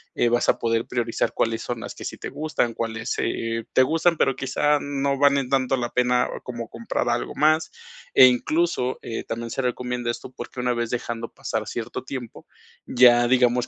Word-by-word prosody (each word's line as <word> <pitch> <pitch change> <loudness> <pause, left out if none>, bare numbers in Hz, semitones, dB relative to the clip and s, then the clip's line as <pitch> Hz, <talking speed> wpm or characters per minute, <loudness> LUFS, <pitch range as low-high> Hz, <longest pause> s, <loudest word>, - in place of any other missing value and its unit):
eh, - - +2
vas 120 +1 +2
a - - +4
poder 115 0 0
priorizar 120 -2 -1
cuáles 115 0 0
son 120 -2 -4
las - - -6
que - - -10
sí - - -5
te - - -6
gustan, 150 -6 -1
cuáles, 115 0 -3
eh, 115 0 -2
te 130 - +6
gustan, 165 +4 +2
pero, 135 - +2
quizás 145 +2 +1
no 140 -1 -1
valen 140 -2 +3
tanto 135 -1 +1
la 120 -1 -3
pena 125 0 +2 0.2
como 120 -2 -6
comprar 115 +1 -3
algo - - -2
más, 155 +1 +3 0.5
e 130 - +10
incluso, 130 +1 +1
eh, 115 - -4
también 115 0 -5
se - - -2
recomienda 125 -1 -2
esto 120 - -5
porque - - -8
una 125 0 +1
vez 120 -1 -2
dejando 120 -1 -4
pasar 110 -1 -4
cierto 115 -2 -5
tiempo, 130 -4 -7 0.4
ya 120 -1 +6
digamos 125 -1 +3
125 Hz, 190 wpm, -24 LUFS, 115-135 Hz, 0.5 s, e